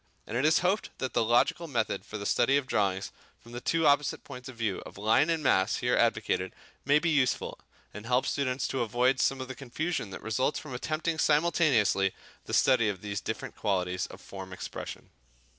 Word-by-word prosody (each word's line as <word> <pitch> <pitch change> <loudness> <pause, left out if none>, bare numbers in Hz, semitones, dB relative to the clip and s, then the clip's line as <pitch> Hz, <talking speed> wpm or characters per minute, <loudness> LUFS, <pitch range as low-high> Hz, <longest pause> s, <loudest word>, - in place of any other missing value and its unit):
And 115 - -6
it 130 +4 +1
is 155 +2 +4
hoped 195 +4 +1
that 130 - -3
the - - +2
logical 120 +9 +2
method 115 -8 -1
for 105 - -6
the 100 - -6
study 135 +6 +3
of 140 - -1
drawing 100 -6 0 0.4
from 115 - -16
the 120 +1 -6
two 165 +3 +1
opposite 145 0 +2
points 125 +1 -9
of 130 - -10
view 110 -4 -2
of - - -12
line 110 +9 +3
and 165 -2 0
mass 95 -5 +3
here 125 0 +1
advocated 110 -5 +1 0.3
may 145 +2 +4
be 165 +2 +1
useful, 140 -5 +1 0.3
and 105 +2 -8
help 125 +1 +2
students 130 -2 -1
to 130 - -1
avoid 125 +3 +2
some 135 +3 +2
of 130 - -5
the 130 - -5
confusion 140 - -3
that 95 - -9
results 120 +7 0
from 150 -4 -7
attempting 155 +5 -2
simultaneously 145 - +3 0.3
the - - -7
study 120 -5 +4
of 95 -3 -4
these 100 -1 -3
different 110 - -5
qualities 90 -3 -1
of - - -12
form 95 -1 -9
expression. - - -7
125 Hz, 200 wpm, -29 LUFS, 105-145 Hz, 0.4 s, is